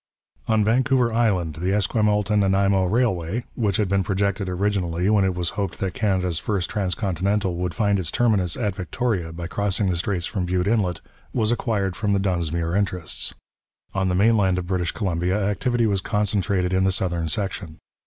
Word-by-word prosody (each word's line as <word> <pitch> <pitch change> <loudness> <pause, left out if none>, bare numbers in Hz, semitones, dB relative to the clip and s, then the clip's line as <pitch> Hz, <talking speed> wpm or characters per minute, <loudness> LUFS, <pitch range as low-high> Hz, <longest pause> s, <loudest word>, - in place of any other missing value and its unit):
On 110 -2 +3
Vancouver 125 +1 +2
Island, 95 -9 +1
the 90 +3 -1
Esquimalt 105 0 +1
and 105 -1 +4
Nanaimo 95 -1 +3
Railway, 105 -1 0
which 105 -5 0
had 105 - +1
been 100 0 +1
projected 100 0 -1
originally 90 -2 0
when 105 -2 +4
it 95 -1 +1
was 90 -2 -1
hoped 100 -3 -3
that 95 -2 -2
Canada's 95 -8 0
first 100 -4 -2
transcontinental 95 -1 -1
would 90 -2 -2
find 100 0 +2
its 85 -4 -2
terminus 100 -6 +1
at 105 -5 -1
Victoria 95 -2 -2
by 85 +1 -6
crossing 100 +2 0
the - - 0
straits 90 -1 -1
from 95 -3 -2
Bute 90 0 0
Inlet, 100 -5 +1 0.3
was 110 -2 +2
acquired 100 -6 -1
from 105 -2 0
the 100 - +2
Dunsmuir 85 -3 -1
interests. 90 -5 -2 0.6
On 95 -1 0
the 90 - +1
mainland 100 -2 +3
of 90 - -2
British 90 -1 -1
Columbia 90 -1 -1
activity 115 +4 0
was 100 -3 +1
concentrated 100 -3 0
in 95 0 +2
the 95 - +3
southern 85 -3 -1
section. 90 -2 -4
95 Hz, 175 wpm, -23 LUFS, 90-105 Hz, 0.6 s, and